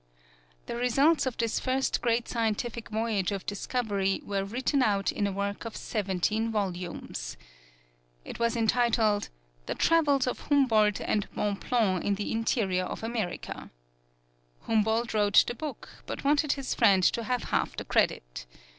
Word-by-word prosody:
The - - -5
results 270 +6 +3
of 255 - -3
this 230 -1 0
first 265 +1 0
great 235 0 +1
scientific 230 0 -2
voyage 215 -3 0
of 195 -2 -4
discovery 205 -2 -1
were 195 -1 -1
written 255 +7 0
out 200 -5 +2
in 205 - -1
a - - -2
work 200 +1 -3
of 230 -2 -7
seventeen 210 +2 -1
volumes. 175 - -4 0.9
It - - -8
was 235 +1 +1
entitled, 225 -2 +2 0.4
"The - - -2
Travels 290 -5 +3
of 250 - -2
Humboldt 225 -8 +3
and 210 -2 -1
Bonpland 205 -2 0
in 205 - +1
the 205 - -3
Interior 215 -5 0
of - - -6
America." 225 -5 -4 0.9
Humboldt 220 +1 +1
wrote 205 -2 +5
the - - -3
book, 285 -1 -7 0.2
but - - -5
wanted 290 +1 +3
his 275 -2 -3
friend 195 -5 +4
to 230 +6 +2
have 250 +1 -1
half - - +1
the - - -5
credit. - - 0
220 Hz, 145 wpm, -28 LUFS, 200-245 Hz, 0.9 s, wrote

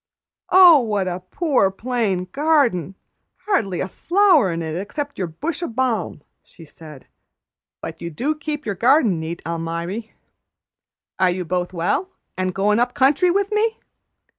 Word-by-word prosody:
"Oh, 360 -4 +8
what 210 -6 -1
a 180 0 -3
poor, 250 - +1
plain 205 -3 -2
garden! 275 - +1 0.5
Hardly 200 - 0
a - - -2
flower 345 - +3
in 165 0 -3
it 160 -1 -4
except 285 - -5
your 185 - -1
bush 300 - -5
o' 345 - -2
balm!" 230 - -2 0.2
she 165 - -16
said. 150 -2 -13 0.8
"But - - -8
you 170 - -4
do 260 - -2
keep 300 -1 -5
your 205 - -2
garden 230 - +3
neat, 160 +2 -6
Almiry. 170 +6 -4 1.1
Are 185 -1 +4
you 180 0 -3
both 180 +1 -2
well, 180 - -1 0.3
an' 185 0 -1
goin' 200 +4 +1
up 245 +2 0
country 285 +6 +3
with 400 +3 0
me?" 440 +1 +1
210 Hz, 150 wpm, -21 LUFS, 180-295 Hz, 1.1 s, Oh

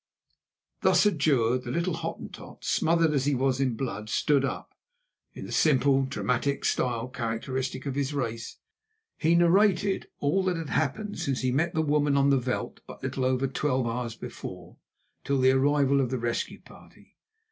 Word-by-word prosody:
Thus 190 -1 +4
adjured, 135 - +2
the 125 - -8
little 170 +6 -1
Hottentot, - - -8
smothered 165 -1 +2
as 135 -2 +1
he 145 -1 +2
was 130 0 +1
in 130 -4 +1
blood, 110 -4 -4
stood 140 +4 +2
up. 135 - -4 0.6
In - - -7
the - - -8
simple, 135 -2 +3
dramatic 130 +1 -1
style 120 -1 0
characteristic 130 +3 -3
of 140 - -2
his 140 0 -1
race, 120 -5 -4 0.6
he 165 +1 +3
narrated 190 +2 +3
all 145 +7 +1
that 180 -2 0
had 160 -3 -5
happened 210 -1 -1
since 135 -2 -1
he 130 -1 +1
met 160 +6 0
the 160 - +2
woman 145 -1 +2
on 140 0 +4
the 135 - +4
veld 125 +1 -4
but - - -11
little 130 - -2
over 130 +1 +1
twelve 135 -1 0
hours 115 0 -3
before, 90 -5 -9 0.5
till 140 - 0
the 130 0 +5
arrival 140 +1 +3
of 130 - -1
the 130 - -1
rescue 120 0 -3
party. - - -18
135 Hz, 170 wpm, -27 LUFS, 125-150 Hz, 0.6 s, the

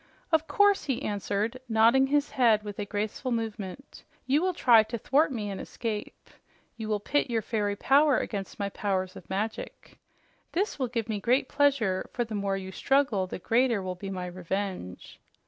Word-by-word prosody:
"Of 320 0 +3
course," 410 -3 +3
he 270 -1 -2
answered, 210 +3 -2
nodding 230 +4 +5
his 290 +1 +1
head 225 -5 +3
with 205 -1 -7
a 205 - -2
graceful 210 +5 -3
movement. 225 +1 -5 0.2
"You 280 +4 +2
will 370 -1 0
try 235 -7 +6
to 225 +2 -4
thwart 280 +7 +2
me 210 -5 -3
and 195 - -5
escape. 215 -3 -5 0.5
You 220 -1 -6
will 210 -1 +1
pit 280 +6 0
your 225 -2 0
fairy 205 -2 -1
power 280 +5 +4
against 200 -3 -4
my 200 0 -2
powers 190 -2 -2
of - - -12
magic. 210 +4 -5 0.5
That 395 +5 0
will 260 - 0
give 230 -2 -3
me 215 -2 -2
great 245 +6 +2
pleasure, 270 -10 +1
for 245 - 0
the 225 -1 -8
more 200 -1 -1
you 190 -1 -6
struggle, 255 -5 +1
the - - -5
greater 230 +1 +1
will 185 0 -3
be 195 +2 -7
my 185 -2 -4
revenge." 180 - -5
220 Hz, 180 wpm, -28 LUFS, 200-265 Hz, 0.5 s, try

